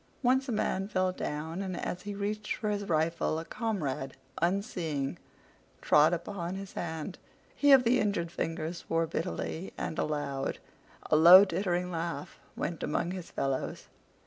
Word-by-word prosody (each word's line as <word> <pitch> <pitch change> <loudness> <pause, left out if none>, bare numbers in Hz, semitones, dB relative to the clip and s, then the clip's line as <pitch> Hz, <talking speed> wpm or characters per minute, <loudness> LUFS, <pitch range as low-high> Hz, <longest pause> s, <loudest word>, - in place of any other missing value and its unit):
Once 260 +2 +3
a - - 0
man 195 -3 0
fell 185 -3 +1
down, 160 +1 -4
and 185 -2 -4
as 180 - -3
he 205 +1 -5
reached 210 +1 -2
for 215 -1 -2
his 205 -1 -2
rifle 160 0 +1
a 160 - -4
comrade, 150 - -3 0.2
unseeing, 170 -6 -1 0.6
trod 150 +2 +5
upon 175 +1 -3
his 195 0 -7
hand. 160 +1 -5 0.4
He 285 -1 +4
of 265 -2 +8
the 245 +2 +3
injured 185 -5 0
fingers 165 0 -3
swore 165 0 0
bitterly, 165 +2 -4
and 160 - -3
aloud. 145 -3 -2 0.5
A - - +6
low, 175 +5 +10
tittering 180 -1 -1
laugh 170 +1 -4 0.2
went 170 - -3
among 170 +3 -1
his 180 -2 -6
fellows. 135 -1 -3
175 Hz, 150 wpm, -30 LUFS, 160-200 Hz, 0.6 s, low